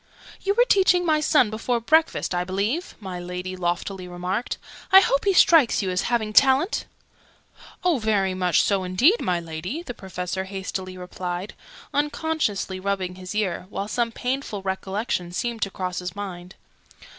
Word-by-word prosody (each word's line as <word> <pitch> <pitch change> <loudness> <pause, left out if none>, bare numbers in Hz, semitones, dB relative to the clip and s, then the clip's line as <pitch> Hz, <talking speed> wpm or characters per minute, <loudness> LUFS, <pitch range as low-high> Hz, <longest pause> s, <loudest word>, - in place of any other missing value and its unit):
"You 400 +1 0
were 485 - +5
teaching 365 -4 +4
my 310 -2 +3
son 295 -7 +3
before 235 +2 -1
breakfast, 315 - +2
I 175 0 0
believe?" 205 - -2
my 190 -4 -6
Lady 180 +1 -5
loftily 180 +1 -3
remarked. 180 +6 -3 0.3
"I 380 - +11
hope 315 -6 +1
he 395 - +4
strikes 320 - +5
you 185 - -1
as 180 +4 -1
having 220 -3 0
talent?" 275 - +4 1.0
"Oh, 350 -7 +2
very 205 -4 +1
much 180 -3 +2
so 195 -2 +1
indeed, 245 - +3
my 180 -1 0
Lady!" 170 - -5
the 245 - -6
Professor 190 -2 -4
hastily 190 -1 -5
replied, 180 +1 -5 0.4
unconsciously 290 -10 -1
rubbing 190 -1 -2
his 185 +2 -8
ear, 190 -4 -1
while 200 0 -4
some 235 +1 0
painful 245 -5 -3
recollection 190 -1 -2
seemed 230 +5 -3
to 195 - +1
cross 185 -2 -4
his 180 -1 -6
mind. 185 -3 -7
195 Hz, 155 wpm, -24 LUFS, 185-260 Hz, 1.0 s, I